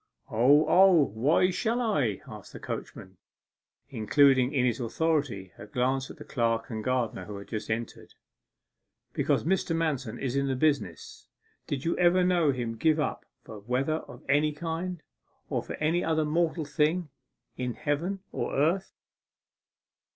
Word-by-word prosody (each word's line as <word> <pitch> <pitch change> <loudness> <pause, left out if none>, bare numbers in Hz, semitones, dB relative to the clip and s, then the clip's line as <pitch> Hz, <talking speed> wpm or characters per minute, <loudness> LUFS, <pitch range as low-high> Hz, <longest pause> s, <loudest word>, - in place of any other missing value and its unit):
'O, 140 +7 +5
O; 190 +1 +6 0.2
why 150 +11 +3
shall 230 +6 0
I?' 145 - 0
asked - - -11
the - - -8
coachman, 95 0 -7 0.7
including 130 +2 +4
in 130 -4 +1
his 120 -1 0
auditory 125 - -1
by - - -10
a - - -17
glance 130 +4 0
the - - -10
clerk 115 -1 -1
and 110 -1 -4
gardener 125 -3 -1
who 105 -1 -7
had 100 - -10
just 110 -1 -5
entered. 115 +1 -5 1.0
'Because - - +1
Mr. 175 -1 0
Manston 145 -8 -2
is 130 -1 -2
in 140 0 +1
the 135 - 0
business. 135 - -1 0.4
Did 140 0 -3
you 170 - +1
ever 180 +1 +4
know 175 -5 +3
him 120 -3 -3
to 115 - -13
give 160 -1 +3
up 150 - -2 0.2
for 110 -2 -10
weather 130 +8 -1
of - - -12
any 150 +2 +2
kind, 165 +2 -4 0.5
or - - 0
for - - -7
any 165 +3 0
other 160 -1 +1
mortal 160 +1 0
thing 155 +3 0 0.5
in 125 -1 -3
heaven 170 +7 -2
or - - -3
earth? 165 +7 +1
145 Hz, 160 wpm, -28 LUFS, 120-165 Hz, 1.0 s, O